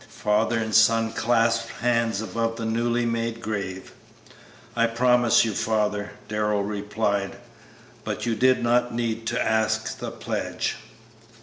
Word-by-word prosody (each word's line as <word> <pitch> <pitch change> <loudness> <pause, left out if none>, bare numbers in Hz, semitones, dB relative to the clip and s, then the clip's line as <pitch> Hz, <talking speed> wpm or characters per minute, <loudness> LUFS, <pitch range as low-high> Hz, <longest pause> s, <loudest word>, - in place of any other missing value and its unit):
Father 110 +2 +1
and 110 -1 -2
son 115 +1 +4
clasped 115 0 +1
hands 115 -3 0
above 115 0 -2
the 115 -1 -5
newly 120 +1 0
made 115 0 -2
grave. 100 -4 -5 0.8
"I 115 0 +3
promise 120 0 +4
you, 110 - -1
father," 105 -1 -1
Darrell 105 -1 0
replied; 100 -1 -2 0.7
"but - - -4
you 115 - +1
did 130 +3 +3
not 120 +1 +2
need 115 -1 -2
to 120 +1 -1
ask 110 0 0
the - - -4
pledge." - - -3
115 Hz, 130 wpm, -25 LUFS, 105-115 Hz, 0.8 s, son